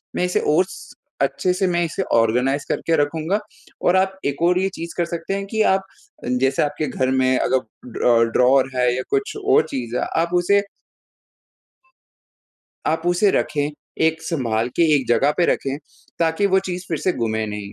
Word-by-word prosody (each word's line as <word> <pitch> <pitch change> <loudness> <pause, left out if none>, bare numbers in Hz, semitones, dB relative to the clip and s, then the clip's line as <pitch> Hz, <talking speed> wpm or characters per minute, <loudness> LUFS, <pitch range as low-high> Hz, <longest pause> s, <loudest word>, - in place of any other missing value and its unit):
मैं 180 - +1
इसे 180 - 0
और 150 +5 +3
स 465 - -12 0.3
अच्छे 185 - +1
से 185 +1 0
मैं 175 -1 +1
इसे 170 +4 -3
ऑर्गेनाइज़ 125 +5 +2
करके 165 - 0
रखूँगा। 160 +6 0 0.5
और 180 - +4
आप 190 0 +1
एक 140 +2 -2
और 180 +1 +3
ये 190 - +1
चीज़ 170 0 -6
कर 175 - +1
सकते 170 +3 -4
हैं 195 0 -3
कि 220 +2 -1
आप 190 0 +2 0.6
जैसे 135 0 +2
आपके 150 0 -2
घर 130 0 -1
में 130 -1 +2
अगर 125 -1 -2
ड्रॉ 115 -1 +4
ड्रॉवर 130 +3 +3
है 125 -1 +2
या 130 - -2
कुछ 410 +1 -1
और 415 +2 +4
चीज़ 120 -2 -5
है - - 0 0.2
आप 170 +1 -2
उसे 190 +3 +3 2.3
आप 160 +1 0
उसे 175 +3 +3
रखें 145 0 0 0.4
एक 160 0 -1
संभाल 120 -7 -1
के 170 - +4
एक 135 -3 +1
जगह 135 +5 +3
पे 175 - +3
रखें 135 0 0 0.4
ताकि 165 +4 +1
वो 190 0 +3
चीज़ 180 0 -4
फ़िर 160 -3 -2
से 185 - 0
गुमे 110 -2 -1
नहीं। 105 -1 -6
160 Hz, 185 wpm, -21 LUFS, 130-180 Hz, 2.3 s, और